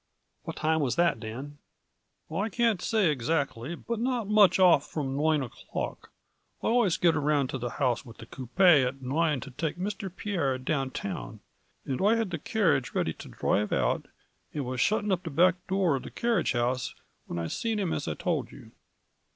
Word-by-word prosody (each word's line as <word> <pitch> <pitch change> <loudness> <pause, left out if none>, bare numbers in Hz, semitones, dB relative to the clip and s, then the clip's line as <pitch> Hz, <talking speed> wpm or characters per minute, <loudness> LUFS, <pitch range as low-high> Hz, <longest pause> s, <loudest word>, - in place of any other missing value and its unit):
" - - -48
What - - -5
time 160 +1 +1
was 130 -6 0
that, 170 -9 +2
Dan? 130 +6 -7 0.2
" - - -50
" - - -29
I 200 +7 -1
can't 225 -4 +1
say 210 -8 +2
exactly, 140 +1 -1
but 230 +6 -4
not 245 -3 -1
much 210 -3 +5
off 180 -6 +5
from 135 -4 -3
nine 150 0 +2
o'clock, 120 - -6 0.5
I - - 0
always 230 -7 +3
get 170 -2 +3
around 145 -3 +1
to 135 - -3
the 120 +1 -3
house 125 -4 +1
with 115 -4 -13
the - - -10
coopay 140 +6 +4
at 130 +1 -3
nine 150 +2 +1
to 135 - -8
take 160 +6 -3
Mr. 195 +1 -4
Pierre 170 -9 -1
down 135 0 -1
town, 75 - -6 0.4
and 130 -2 -2
I 210 +4 +4
had 225 -5 -1
the 170 - -3
carriage 150 - +1
ready 80 - 0
to - - -11
drive 105 0 0
out, - - 0 0.5
and 145 -3 -2
was 125 0 -2
shutting 210 0 +2
up 185 -2 +1
the 170 - -5
back 180 +4 +2
door 185 -6 +2
of - - -6
the - - -8
car 235 -1 +1
riage - - 0
house 125 +1 -1 0.3
whin - - -4
I 85 - -2
seen 225 - -2
him 190 -5 0
as - - -3
I - - -2
told - - -2
you." - - -13
155 Hz, 205 wpm, -28 LUFS, 130-190 Hz, 0.5 s, much